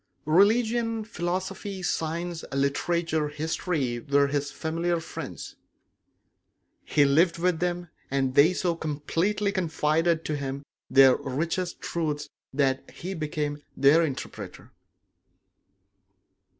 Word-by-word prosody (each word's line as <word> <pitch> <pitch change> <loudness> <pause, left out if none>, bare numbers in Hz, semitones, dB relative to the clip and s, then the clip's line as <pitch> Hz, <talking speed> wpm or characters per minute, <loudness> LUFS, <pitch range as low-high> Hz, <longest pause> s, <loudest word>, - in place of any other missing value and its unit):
Religion, 225 +6 +3
philosophy, 190 -1 -4
science, 170 0 -2
literature, 155 +3 0
history 150 -4 -2
were 140 +2 +3
his 140 0 -1
familiar 165 +3 -1
friends; 165 - -7 1.3
he 145 -2 +3
lived 165 +5 +3
with 175 -1 +1
them, 175 0 -1 0.2
and 135 -1 0
they 145 +6 +6
so 180 -2 0
completely 165 +7 -1
confided 165 -2 +1
to 155 - -1
him 140 0 -4 0.3
their 135 -1 +7
richest 165 +6 -3
truths 150 -3 -2 0.2
that 135 -1 0
he 185 +3 -6
became 150 -3 -3 0.2
their 150 +5 +6
interpreter. 140 -5 -6
160 Hz, 100 wpm, -27 LUFS, 145-175 Hz, 1.3 s, their